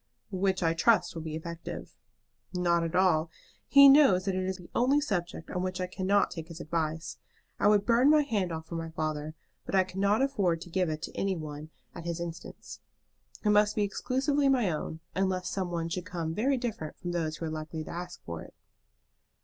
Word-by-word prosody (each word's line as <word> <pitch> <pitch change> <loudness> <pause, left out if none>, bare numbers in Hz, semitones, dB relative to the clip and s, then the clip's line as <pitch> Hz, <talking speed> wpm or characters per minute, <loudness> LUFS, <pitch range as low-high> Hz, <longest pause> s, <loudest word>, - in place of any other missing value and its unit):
"Which 190 -1 0
I 165 0 +3
trust 215 +7 +3
will 165 - -5
be 155 -1 -5
effective." 165 - -7 0.6
"Not 170 -1 +2
at 165 +1 -3
all. 175 -4 +3 0.4
He 280 0 +9
knows 270 -10 +6
that 195 - 0
it 185 0 -1
is 190 0 -2
the 180 -2 -13
only 265 +4 +3
subject 180 - -3
on 180 - -2
which 185 0 -3
I 185 - 0
cannot 190 +2 +1
take 165 -2 -6
his 165 -1 -9
advice. 160 0 -3 0.4
I - - +4
would 205 -1 +4
burn 240 +5 +5
my 305 0 +6
hand 205 -10 -1
off 160 -1 -5
for 165 - -10
my 165 -1 -4
father, 155 -1 -3 0.3
but - - -3
I 190 - +5
cannot 200 +6 +1
afford 200 -12 +1
to 175 - -10
give 180 -1 +1
it 155 0 -4
to - - -6
any 195 -1 0
one 155 -1 -7 0.2
at 170 - -9
his 170 0 -3
instance. 170 0 -7 0.7
It 210 - +5
must 210 0 +4
be 210 - +2
exclusively 270 +7 +1
my 245 -9 +3
own, 160 +1 -4
unless 185 -1 0
some 190 -2 -2
one 170 -1 -2
should 180 +2 -4
come 165 -4 -3
very 260 +9 +1
different 225 -11 -4
from 175 - -5
those 160 -3 -2
who 165 - -4
are 160 - -3
likely 155 0 -5
to - - -8
ask 175 +1 -7
for 85 -1 -5
it." - - -13
180 Hz, 210 wpm, -29 LUFS, 165-205 Hz, 0.7 s, He